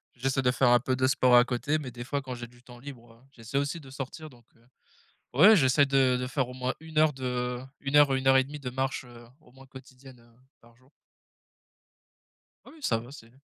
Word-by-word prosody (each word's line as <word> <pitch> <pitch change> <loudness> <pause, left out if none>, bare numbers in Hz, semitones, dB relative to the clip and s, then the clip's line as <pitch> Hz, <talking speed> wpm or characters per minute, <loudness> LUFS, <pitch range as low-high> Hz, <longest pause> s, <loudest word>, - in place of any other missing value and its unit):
j'essaie 135 +2 -1
de 125 - +3
faire 130 0 +2
un 120 0 +5
peu 130 +2 -2
de 130 0 +1
sport 130 -2 +3
à 120 - +7
côté 130 +5 -2
mais 140 -4 -7
des 120 0 -8
fois 140 +3 -3
quand 130 -2 -7
j'ai 120 0 -8
du 120 +1 -22
temps 125 -1 -15
libre, 120 -3 -12
heu, - - -22
j'essaie 120 0 -6
aussi 140 +4 -2
de 140 -4 -14
sortir, 135 +4 -8
donc 120 -4 -21
heu, 115 - -28 0.7
ouais, 200 - +7
j'essaie 140 -1 +3
de 135 -2 +2
de 125 0 -4
faire 130 0 -2
au 125 - -10
moins 130 0 -3
1 160 0 -10
heure 155 0 +4
de 125 -1 -3 0.2
1 140 +1 +1
heure 145 -1 +6
ou - - +2
1 130 0 -2
heure 135 0 +6
et 130 - +2
1/2 145 +2 -9
de 130 -3 -6
marche, 130 +2 -3
heu, 120 -1 -15 0.2
au 125 - -22
moins 135 +1 -17
quotidienne, 130 -1 -15
heu, 115 0 -25 0.3
par 115 0 -22
jour. 130 +2 -27 1.8
Oui, - - -15
oui, - - -17
ça 115 - 0
va, 120 +3 -10
c'est 115 -5 -14
130 Hz, 245 wpm, -27 LUFS, 125-135 Hz, 1.8 s, à